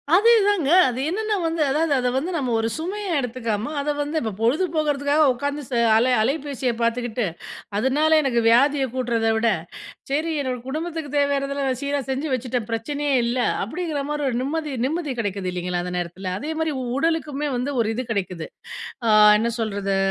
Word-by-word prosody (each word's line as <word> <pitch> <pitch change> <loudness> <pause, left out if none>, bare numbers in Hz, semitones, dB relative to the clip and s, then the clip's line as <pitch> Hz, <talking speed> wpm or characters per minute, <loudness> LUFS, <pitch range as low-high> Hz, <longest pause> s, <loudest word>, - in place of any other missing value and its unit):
அதேதாங்க. 410 -7 +4 0.2
அது 250 +1 -4
என்னென்ன 430 +4 -1
வந்து 325 0 -1
அதாவது 310 0 +1
அத 250 -1 0
வந்து 335 +7 -2
நம்ம 255 -4 -1
ஒரு 225 - 0
சுமையா 385 +5 -4
எடுத்துக்காம 235 0 -3
அத 295 - -2
வந்து 290 +2 -2
இப்ப 220 -2 -2
பொழுது 245 +11 +2
போகறதுக்காக 295 0 +2
உட்காந்து 285 +3 -3
ச - - -7 0.2
அல 250 +3 +3
அலைபேசிய 270 0 -1
பாத்துக்கிட்டு, 235 0 0 0.5
அதனால 295 +7 +3
எனக்கு 255 -4 +1
வியாதிய 270 +4 +4
கூட்டுறத 235 -3 0
விட, 225 +1 +2 0.6
சரி 315 +4 0
என்னோட 255 -2 -2
குடும்பத்துக்கு 315 0 -4
தேவையானதெல்லாம் 275 -2 0
சீரா 280 0 0
செஞ்சு 275 +3 -2
வச்சுட்டேன் 245 -2 -2
பிரச்சனையே 285 +5 -1
இல்ல 240 +2 -1 0.3
அப்படிங்கிற 310 - -3
மாதிரி 295 -1 -1
ஒரு 240 - -1
நிம்மதி 300 +1 -2
நிம்மதி 305 -1 -2
கெடைக்குது 200 -4 -2
இல்லைங்களா? 180 0 -2
அந்த 180 0 -5
நேரத்தில, 175 +2 -5
அதே 305 +3 -4
மாதிரி 320 -2 0 0.2
உடலுக்குமே 295 -2 0
வந்து 265 +4 -2
ஒரு 220 - 0
இது 255 - -3
கெடைக்குது. 185 -6 -3 0.6
ஆ - - +2 0.3
என்ன 230 +2 0
சொல்றது? 200 -3 -1
275 Hz, 160 wpm, -23 LUFS, 235-300 Hz, 0.6 s, அதேதாங்க